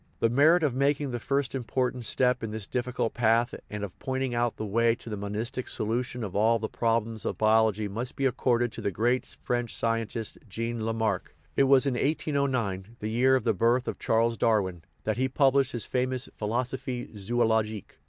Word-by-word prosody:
The 115 Hz, -, +2 dB
merit 160 Hz, +7 st, +5 dB
of 145 Hz, -5 st, +2 dB
making 140 Hz, +1 st, +1 dB
the 120 Hz, -, -3 dB
first 135 Hz, +1 st, -1 dB
important 125 Hz, -1 st, -1 dB
step 125 Hz, +1 st, +2 dB
in 115 Hz, -, -3 dB
this 110 Hz, -1 st, -4 dB
difficult 125 Hz, 0 st, -2 dB
path 115 Hz, 0 st, +2 dB, 0.2 s
and 105 Hz, -1 st, -5 dB
of 100 Hz, -, -7 dB
pointing 130 Hz, -1 st, -2 dB
out 120 Hz, -1 st, 0 dB
the 110 Hz, -, -3 dB
way 115 Hz, +3 st, +2 dB
to 115 Hz, -, -10 dB
the -, -, -2 dB
monistic 110 Hz, +6 st, -4 dB
solution 120 Hz, +2 st, -2 dB
of 100 Hz, -4 st, -5 dB
all 110 Hz, +3 st, +4 dB
the 110 Hz, -, -3 dB
problems 115 Hz, -1 st, -1 dB
of -, -, -2 dB
biology 110 Hz, -1 st, +3 dB
must 115 Hz, +6 st, -5 dB
be 135 Hz, -, -1 dB
accorded 120 Hz, -2 st, +1 dB
to -, -, -7 dB
the -, -, 0 dB
great 120 Hz, +6 st, 0 dB, 0.2 s
French 120 Hz, -1 st, -1 dB
scientist, 115 Hz, -1 st, -2 dB
Jean 115 Hz, +2 st, -3 dB
Lamarck; 110 Hz, -4 st, -1 dB, 0.2 s
it 140 Hz, -, +4 dB
was 135 Hz, 0 st, +5 dB
in 135 Hz, -, +1 dB
1809, 125 Hz, -8 st, -1 dB
the 105 Hz, +1 st, -3 dB
year 130 Hz, +3 st, +4 dB
of 130 Hz, -, 0 dB
the 115 Hz, -, +2 dB
birth 120 Hz, +5 st, +2 dB
of -, -, -3 dB
Charles 115 Hz, +1 st, +2 dB
Darwin, 95 Hz, -6 st, +1 dB, 0.2 s
that 110 Hz, 0 st, -1 dB
he 130 Hz, +1 st, +1 dB
published 135 Hz, 0 st, +3 dB
his 120 Hz, -4 st, -4 dB
famous 130 Hz, 0 st, -1 dB
Philo 110 Hz, +4 st, 0 dB
sophie 125 Hz, -1 st, -5 dB
Zoologique. 110 Hz, 0 st, 0 dB
120 Hz, 190 wpm, -28 LUFS, 110-130 Hz, 0.2 s, merit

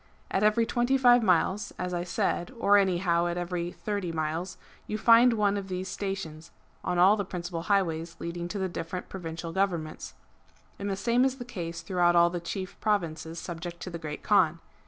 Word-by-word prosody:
At 190 Hz, -, +1 dB
every 215 Hz, +2 st, +3 dB
twenty 240 Hz, +3 st, +1 dB
five 245 Hz, -2 st, +6 dB
miles, 200 Hz, +1 st, +1 dB
as 180 Hz, 0 st, -3 dB
I 175 Hz, 0 st, -1 dB
said, 175 Hz, 0 st, -1 dB
or 205 Hz, -3 st, +4 dB
anyhow 175 Hz, -3 st, +2 dB
at 175 Hz, 0 st, -2 dB
every 175 Hz, 0 st, -3 dB
thirty 200 Hz, -4 st, -3 dB
miles, 165 Hz, +3 st, -3 dB, 0.3 s
you 215 Hz, -, -2 dB
find 235 Hz, +2 st, +6 dB
one 205 Hz, -2 st, +1 dB
of 195 Hz, -1 st, -5 dB
these 185 Hz, 0 st, -4 dB
stations, 180 Hz, -6 st, -5 dB, 0.3 s
on 180 Hz, -, -1 dB
all 190 Hz, +4 st, +6 dB
the 205 Hz, -, -2 dB
principal 175 Hz, -2 st, -5 dB
highways 170 Hz, -4 st, +1 dB
leading 170 Hz, 0 st, -5 dB
to 205 Hz, -, -5 dB
the 190 Hz, -1 st, -1 dB
different 180 Hz, 0 st, -5 dB
provincial 165 Hz, -2 st, -6 dB
govern 190 Hz, -4 st, +1 dB
ments; 155 Hz, -, -9 dB, 0.6 s
and 200 Hz, 0 st, -3 dB
the 195 Hz, -, -1 dB
same 235 Hz, +6 st, +2 dB
is 265 Hz, 0 st, +1 dB
the 245 Hz, -, -7 dB
case 170 Hz, -8 st, -5 dB
throughout 175 Hz, -3 st, +2 dB
all 170 Hz, 0 st, +5 dB
the 175 Hz, -, -3 dB
chief 185 Hz, +2 st, -6 dB
provinces 170 Hz, -6 st, -1 dB
subject 170 Hz, 0 st, -6 dB
to 180 Hz, -, -6 dB
the 170 Hz, -, -5 dB
Great 150 Hz, -2 st, -6 dB
Kaan. 170 Hz, -6 st, +3 dB
180 Hz, 195 wpm, -28 LUFS, 170-205 Hz, 0.6 s, five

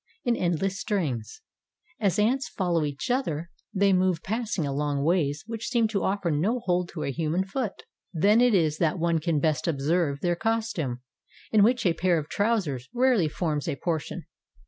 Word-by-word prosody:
In 240 Hz, -1 st, +2 dB
endless 185 Hz, +2 st, -1 dB
strings, 150 Hz, -, -2 dB, 0.6 s
as 200 Hz, -4 st, +1 dB
ants 245 Hz, +6 st, +1 dB
follow 175 Hz, -5 st, 0 dB
each 145 Hz, -, -3 dB
other, 170 Hz, -, -1 dB, 0.2 s
they 200 Hz, 0 st, +3 dB
move, 185 Hz, -2 st, +2 dB
passing 220 Hz, -5 st, -2 dB
along 140 Hz, 0 st, -1 dB
ways 150 Hz, -3 st, +1 dB
which 225 Hz, 0 st, -5 dB
seem 235 Hz, -3 st, +2 dB
to 200 Hz, -3 st, -1 dB
offer 190 Hz, -3 st, 0 dB
no 195 Hz, +12 st, +1 dB
hold 180 Hz, -4 st, 0 dB
to 160 Hz, -, -4 dB
a 140 Hz, -, -1 dB
human 165 Hz, +5 st, -1 dB
foot. 210 Hz, +1 st, -4 dB, 0.3 s
Then 205 Hz, +7 st, +4 dB
it 245 Hz, -3 st, +4 dB
is 155 Hz, -4 st, +2 dB
that 165 Hz, 0 st, +1 dB
one 170 Hz, -1 st, +1 dB
can 160 Hz, -1 st, 0 dB
best 155 Hz, +1 st, 0 dB
observe 150 Hz, -1 st, 0 dB
their 175 Hz, -1 st, +1 dB
costume, 200 Hz, -, -2 dB, 0.5 s
in 215 Hz, -, +5 dB
which 235 Hz, +3 st, +3 dB
a 175 Hz, -, +4 dB
pair 175 Hz, 0 st, +2 dB
of 150 Hz, -1 st, -4 dB
trousers 195 Hz, -, 0 dB
rarely 245 Hz, -10 st, +3 dB
forms 150 Hz, -2 st, -2 dB
a 155 Hz, -, -1 dB
por 160 Hz, +3 st, -1 dB
tion. -, -, -8 dB
175 Hz, 180 wpm, -26 LUFS, 155-210 Hz, 0.6 s, in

